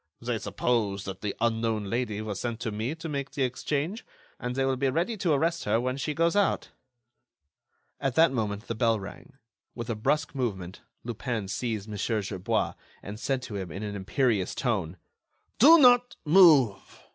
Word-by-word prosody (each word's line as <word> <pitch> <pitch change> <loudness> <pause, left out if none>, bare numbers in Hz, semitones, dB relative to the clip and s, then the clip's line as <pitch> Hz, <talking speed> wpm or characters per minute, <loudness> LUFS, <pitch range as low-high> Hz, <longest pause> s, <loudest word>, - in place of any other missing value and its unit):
They 120 -1 -2
suppose 100 -1 -1
that 95 -1 -7
the 105 -2 -3
unknown 115 -2 0
lady 110 0 -2
was 105 -3 -4
sent 120 -1 -4
by 115 - -2
me 110 +8 -3
to 165 0 -7
make 140 -2 -3
the 140 -2 0
exchange, 145 - -2 0.4
and 125 0 -4
they 135 0 +1
will 135 0 +1
be 135 +1 0
ready 170 - 0
to 175 -5 +1
arrest 165 +4 0
her 110 +2 +2
when 130 +1 -1
she 145 +2 -3
goes 165 +3 +2
out—" 205 -1 +1 1.3
At 135 -3 -1
that 165 -3 +5
moment, 105 -3 -2
the - - -3
bell 115 -1 +1
rang. 100 +9 -10 0.4
With 120 -1 -4
a - - -2
brusque 145 +7 0
movement, 100 -9 -4 0.2
Lupin 115 -2 -3
seized 110 0 -3
Mon. 105 -2 -6
Gerbois, 100 -4 -1 0.3
and 105 +2 -7
said 130 +1 -1
to 110 - -7
him, 95 -3 -5
in 95 +6 -6
an 105 -1 -4
imperious 100 0 0
tone: 95 - -1 0.6
"Do 310 +8 +9
not 245 -4 +5
move! 150 - +5
120 Hz, 180 wpm, -27 LUFS, 105-140 Hz, 1.3 s, Do